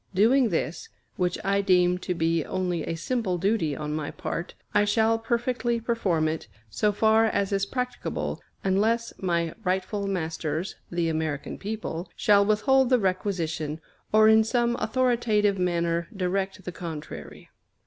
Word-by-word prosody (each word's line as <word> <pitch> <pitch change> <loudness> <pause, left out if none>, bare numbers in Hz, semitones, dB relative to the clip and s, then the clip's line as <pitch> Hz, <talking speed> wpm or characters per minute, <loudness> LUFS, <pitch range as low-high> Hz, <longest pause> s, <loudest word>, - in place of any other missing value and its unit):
Doing 235 +5 +4
this, 165 -2 -2 0.3
which 180 -1 0
I 200 +1 +2
deem 180 -2 +3
to 180 0 -3
be 165 -1 +1
only 180 -3 -2
a 165 - -3
simple 195 0 -1
duty 180 -5 +1
on 150 0 -4
my 155 0 -3
part, 170 - -5 0.2
I 205 - +4
shall 220 +2 +2
perfectly 235 0 0
perform 200 -9 0
it, 155 -5 -3 0.2
so 210 - +2
far 220 +2 +4
as 200 -3 0
is 195 0 0
practicable, 250 0 -3 0.2
unless 220 +5 +1
my 170 -3 0
rightful 190 +2 -1
masters, 165 -2 -2
the 170 -1 0
American 155 -3 -2
people, 200 -5 -4
shall 205 -1 +4
withhold 245 +5 +3
the 255 - +5
requisition, 170 -6 -1 0.3
or 215 0 +6
in 220 0 +6
some 235 +1 +1
authoritative 220 -4 +1
manner 170 -1 0
direct 190 0 -2
the 180 - -5
contrary. 160 -3 -8
195 Hz, 145 wpm, -26 LUFS, 170-220 Hz, 0.3 s, or